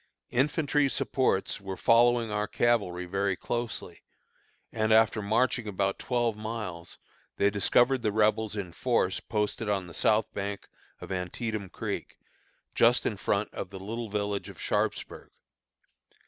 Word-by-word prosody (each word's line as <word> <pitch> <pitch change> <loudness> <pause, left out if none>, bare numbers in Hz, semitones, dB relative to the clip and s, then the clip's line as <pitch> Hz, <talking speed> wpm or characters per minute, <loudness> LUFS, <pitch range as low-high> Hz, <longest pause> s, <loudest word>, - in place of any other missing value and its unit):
Infantry 145 +2 +2
supports 130 -8 0
were 95 -1 -5
following 120 -1 +4
our 105 0 -1
cavalry 100 -8 +1
very 95 +1 0
closely, 115 -6 -4 0.7
and, 110 -1 0
after 110 0 +4
marching 110 +2 +1
about 100 -1 -1
twelve 120 -3 0
miles, 105 -6 -6 0.4
they 100 0 +3
discovered 120 +5 +3
the 105 - +1
Rebels 110 0 +2
in 95 -5 -5
force 115 -6 +1
posted 105 0 -2
on 100 -3 0
the 85 - -11
south 110 +1 +3
bank 100 0 -4 0.3
of - - -8
Antietam 95 +3 -3
Creek, - - -5 0.6
just 120 +2 +4
in 105 - 0
front 100 +2 -1
of 95 - -5
the 95 - -8
little 110 +4 -5
village 100 -1 -2
of - - -12
Sharpsburg. - - -2
105 Hz, 135 wpm, -28 LUFS, 100-115 Hz, 0.7 s, following